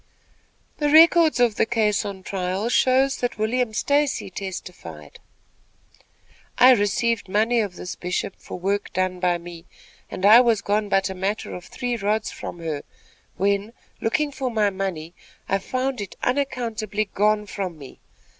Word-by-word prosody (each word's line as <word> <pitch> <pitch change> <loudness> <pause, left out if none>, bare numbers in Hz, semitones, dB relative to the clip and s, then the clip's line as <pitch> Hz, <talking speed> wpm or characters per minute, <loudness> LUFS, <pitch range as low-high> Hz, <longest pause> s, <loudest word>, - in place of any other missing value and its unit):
The 295 -1 +1
records 325 -1 +6
of 235 -3 +3
the - - +3
case 215 -3 +1
on 195 -2 -6
trial 190 +4 -2
shows 265 +2 +3
that 245 -3 -3
William 225 +2 0
Stacy 285 -1 0
testified: 175 - -8 1.4
"I 255 +1 +8
received 225 -1 +1
money 225 +4 +2
of 200 -5 -2
this 180 - -6
Bishop 180 +1 -3
for - - -8
work 200 +3 -2
done 185 0 -1
by 180 -1 +1
me, 170 -1 -11 0.4
and 185 - -3
I 220 +4 +9
was 230 -4 +2
gone 205 0 0
but 195 -1 +1
a - - -4
matter 195 +3 -3
of 180 - -8
three 245 -2 -3
rods 215 +1 -1
from - - -7
her, 160 -4 -4 0.6
when, 200 +3 0 0.3
looking 290 +6 0
for 265 -2 -3
my 215 -3 +1
money, 185 -4 -4 0.3
I 195 - +1
found 255 +3 -2
it 200 - -7
unaccountably 235 -6 -1
gone 210 +1 +2
from 190 -4 -5
me. 140 -3 -12
210 Hz, 155 wpm, -23 LUFS, 190-240 Hz, 1.4 s, I